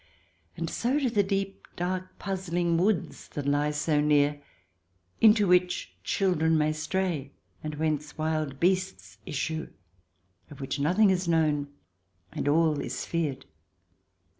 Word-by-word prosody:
And 165 - -2
so 245 - 0
do 260 -5 0
the 210 -3 +3
deep, 195 0 -3
dark, 185 +1 -3
puzzling 175 -3 -1
woods 180 +1 0
that 145 - -3
lie 145 +1 +2
so 150 0 +1
near, 145 -1 +3 0.8
into 210 -2 +6
which 180 0 +2
children 160 -4 +2
may 155 0 +2
stray, 155 -3 -2 0.3
and 155 -1 -4
whence 150 -1 -2
wild 155 -3 -2
beasts 190 +2 0
issue, 160 +3 -3 0.8
of 145 - -12
which 135 +1 -3
nothing 185 +8 +4
is 185 -1 0
known 155 -3 +2 0.6
and - - -3
all 155 0 +3
is - - -4
feared. 155 -6 -2
165 Hz, 130 wpm, -28 LUFS, 150-185 Hz, 0.8 s, into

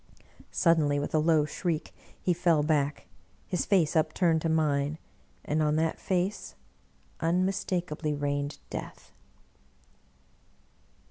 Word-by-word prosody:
Suddenly, 160 -4 +3
with 145 - -3
a 155 - +4
low 155 -1 +3
shriek, 165 +1 -3 0.3
he 180 - +1
fell 170 -3 +2
back, 145 -2 0 0.4
his 180 - -2
face 175 -7 +3
upturned 160 +1 +2
to 165 - 0
mine, 150 -2 +1 0.5
and 155 +1 0
on 150 0 +2
that 160 +1 0
face 185 +2 -2 0.6
unmistakably 175 -3 -1
reigned 145 0 -2
Death. - - -7
160 Hz, 110 wpm, -28 LUFS, 150-175 Hz, 0.6 s, a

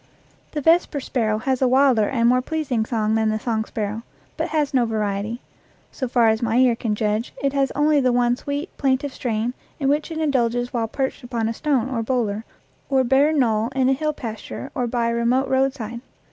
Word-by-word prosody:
The 300 - -2
vesper 325 -1 +3
sparrow 225 -5 -1
has 260 +3 -1
a 260 - +4
wilder 255 -4 +4
and 235 -3 +2
more 250 +1 +4
pleas 310 +1 -4
ing 225 -3 +1
song 220 -2 0
than 220 0 +2
the 215 - 0
song 220 -1 -1
sparrow, 215 0 -4 0.3
but - - -2
has 300 -3 0
no 255 -2 +4
variety; 215 +1 -2 0.5
so 260 - -3
far 235 -2 +3
as 220 0 +1
my 230 0 +1
ear 250 -2 +4
can 225 -2 -2
judge, 215 +2 -1
it 275 0 +1
has 275 -1 +2
only 295 0 +3
the 255 -2 +2
one 240 0 +2
sweet, 285 +6 -5
plaintive 270 0 0
strain 230 0 -2 0.3
in 275 -2 +1
which 295 +3 0
it 325 - -5
indulges 245 -5 0
while 230 -2 0
perched 265 +3 -3
upon 235 -2 -2
a 225 - -1
stone 270 -1 0
or 255 -3 -2
boulder 225 -3 -1 0.4
or 265 -2 +3
bare 270 +4 +3
knoll 230 -7 +2
in 260 -1 +3
a - - +4
hill 305 +3 -1
pas 225 -7 -6
ture 275 - -7
or 245 - -1
by 235 -1 0
a - - 0
remote 240 +3 +1
roadside. 260 -3 -1
245 Hz, 215 wpm, -22 LUFS, 225-270 Hz, 0.5 s, a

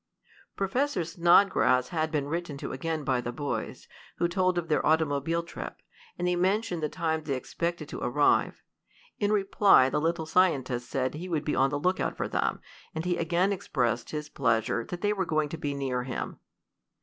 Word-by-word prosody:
Professor 195 - 0
Snodgrass 170 -7 +4
had 160 -2 -1
been 150 -3 -1
written 165 -2 -3
to - - -5
again 155 +3 -3
by 130 -2 +1
the 120 - -4
boys, 145 +3 -4 0.3
who 170 - +2
told 185 0 +1
of 170 -1 -1
their 155 - +1
automobile 160 +1 +1
trip, 170 - -8 0.4
and 180 - -1
they 180 - +2
mentioned 185 0 0
the 150 - -1
time 160 0 -1
they 145 -3 -2
expected 170 +4 -3
to - - -7
arrive. 145 +4 +2 0.6
In 205 0 +1
reply 195 -9 +5
the 150 - 0
little 165 0 0
scientist 135 -8 +1
said 130 -1 -1
he 175 +5 -6
would 155 -3 -1
be 150 - 0
on 135 +1 +3
the 145 - -1
lookout 180 +5 0
for - - -1
them, - - -1 0.3
and 160 +2 -3
he 180 -1 +1
again 175 +4 +1
expressed 120 - -1
his 150 -1 -4
pleasure 115 -4 0
that 175 - -6
they 210 0 +2
were 195 -2 -1
going 155 -3 0
to 165 - -5
be 145 -1 -2
near 130 -3 -1
him. 125 -1 -5
160 Hz, 185 wpm, -28 LUFS, 140-175 Hz, 0.6 s, reply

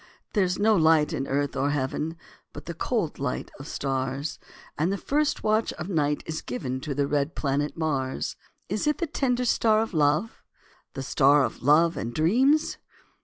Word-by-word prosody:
There 205 - +3
is 180 0 0
no 215 +1 +4
light 160 -2 +4
in 135 -3 -2
earth 140 0 -1
or 135 +1 +1
heaven, 145 +3 -2 0.4
But 145 - -9
the 170 - -5
cold 180 -1 -2
light 135 -2 -3
of 145 - -8
stars; 135 +2 -3 0.4
And 165 +5 0
the 200 - -1
first 290 +7 0
watch 215 +1 +1
of 175 +4 -6
night 150 -5 0
is 160 0 -4
given 125 +1 -4
To 145 -1 -4
the 140 0 +1
red 145 +2 -1
planet 145 +2 -1
Mars. 140 -5 -2 0.3
Is 210 +9 -2
it 300 - +2
the 345 - -1
tender 250 -5 0
star 220 -2 +3
of 225 - -7
love? 155 +7 +1 0.5
The 135 - -4
star 145 +1 +4
of - - -3
love 160 +5 +4
and 115 +1 -4
dreams? 260 - +3
155 Hz, 180 wpm, -26 LUFS, 140-205 Hz, 0.5 s, no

